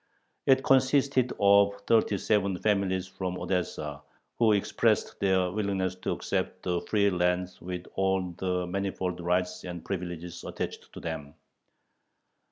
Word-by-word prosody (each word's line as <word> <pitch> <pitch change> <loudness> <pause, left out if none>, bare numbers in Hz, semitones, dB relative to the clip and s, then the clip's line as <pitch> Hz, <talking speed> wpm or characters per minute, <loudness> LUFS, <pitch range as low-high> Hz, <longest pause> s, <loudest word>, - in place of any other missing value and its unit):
It 135 0 +5
consisted 135 -1 +3
of 100 0 +5
thirty 110 -3 +3
seven 100 -1 +1
families 95 -2 +1
from 95 -1 -4
Odessa, 75 -6 -2 0.4
who 115 -2 +5
expressed 100 - +1
their 95 -2 +2
willingness 100 -2 -1
to 90 - -3
accept - - -3
the 90 -1 0
free 100 -2 +2
lands 90 0 0
with 90 0 -5
all 95 -1 0
the 90 -1 0
manifold 95 -1 -2
rights 90 +1 0
and 90 -2 -7
privileges 90 -2 -5
attached - - -5
to - - -8
them. 80 -3 -6
95 Hz, 130 wpm, -28 LUFS, 90-100 Hz, 0.4 s, It